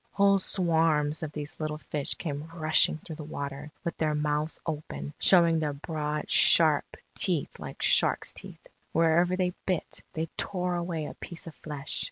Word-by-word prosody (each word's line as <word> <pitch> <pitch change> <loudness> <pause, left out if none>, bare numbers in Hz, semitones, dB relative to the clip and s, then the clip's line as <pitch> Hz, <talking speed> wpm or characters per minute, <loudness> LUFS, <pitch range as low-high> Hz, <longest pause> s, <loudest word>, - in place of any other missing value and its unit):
Whole 200 -1 +4
swarms 160 -5 +2
of 155 -2 -4
these 150 0 -6
little 155 -1 -2
fish 150 -2 -3
came 150 -2 -5
rushing 160 -1 +4
through 155 0 -9
the 155 - -6
water, 140 0 -6
with 170 - -3
their 155 -1 +1
mouths 150 +1 -1
open, 75 - -5
showing 170 -3 +5
their 150 -2 -1
broad, 150 0 -3
sharp 155 -3 +5 0.2
teeth 175 -7 -1
like - - -7
sharks' - - +3
teeth. - - -8 0.3
Wherever 170 +3 +3
they 180 -1 0
bit, 185 -4 -1
they 160 +1 -1
tore 180 -2 -1
away 170 -3 -2
a - - -6
piece 170 - -8
of 165 - -8
flesh. 145 -2 -4
155 Hz, 165 wpm, -28 LUFS, 150-170 Hz, 0.3 s, showing